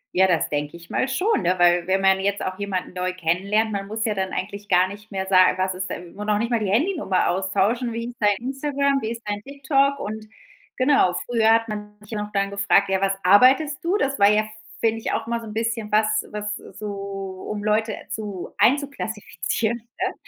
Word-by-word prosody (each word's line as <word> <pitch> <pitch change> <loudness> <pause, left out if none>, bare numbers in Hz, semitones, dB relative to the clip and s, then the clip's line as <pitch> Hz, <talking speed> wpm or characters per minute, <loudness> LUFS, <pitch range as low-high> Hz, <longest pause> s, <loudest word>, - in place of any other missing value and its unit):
Ja, 190 +1 +5
das 170 -4 +1
denke 145 +2 -3
ich 170 0 -15
mal 260 - +1
schon, 370 +12 +1
ne, 180 0 +2
weil, 175 0 +4
wenn 190 +1 +2
man 190 0 +4
jetzt 200 +1 -1
auch 185 +1 -4
jemanden 190 -3 -3
neu 185 0 -2
kennenlernt 195 +6 0
man 200 -1 -3
muss 220 +1 -3
ja 215 - +1
dann 190 -1 -2
eigentlich 205 +2 -5
gar 180 +1 +4
nicht 210 +2 -11
mehr 190 -1 -2
sa 185 -1 +5
was 185 0 0
ist 185 0 -4
denn 175 -1 -7
noch 210 0 -1
nicht 230 +3 -2
mal 235 - +2
die 210 - -2
Handynummer 255 - +1
austauschen. 200 +6 0
„Wie 230 +1 -4
ist 245 - -12
dein 205 -2 +3
Instagram? 275 +2 -1
Wie 220 - -3
ist 235 0 -6
dein 205 0 -2
TikTok?" 275 +2 +1
Und 215 -1 -6 0.5
genau, 255 -9 +3
früher 225 -2 +3
hat 225 0 +3
man 210 -1 -6
sich 210 - -16
ja 210 -2 -2
noch 210 0 -6
dann 200 -1 0
gefragt: 200 0 +3
„Ja, 190 0 +1
was 195 0 +1
arbeitest 260 +10 +5
du?" 355 +4 +1
Das 275 - -1
war 200 0 +7
ja, 210 0 +4
f 215 - -6
f 215 - -13 0.3
finde 225 0 +1
ich, - - -3
auch 225 - -1
mal 235 0 -1
so 225 - -9
'n 210 - -7
bisschen 225 -1 -2
was 215 +1 +5 0.3
was 210 0 -3 0.2
so 195 -2 -6
um 205 -1 -4
Leute 215 +1 +1
zu 205 -4 -5
einzuklassifizieren, 235 -4 0
ne? 235 +2 -4
210 Hz, 220 wpm, -23 LUFS, 190-230 Hz, 0.5 s, war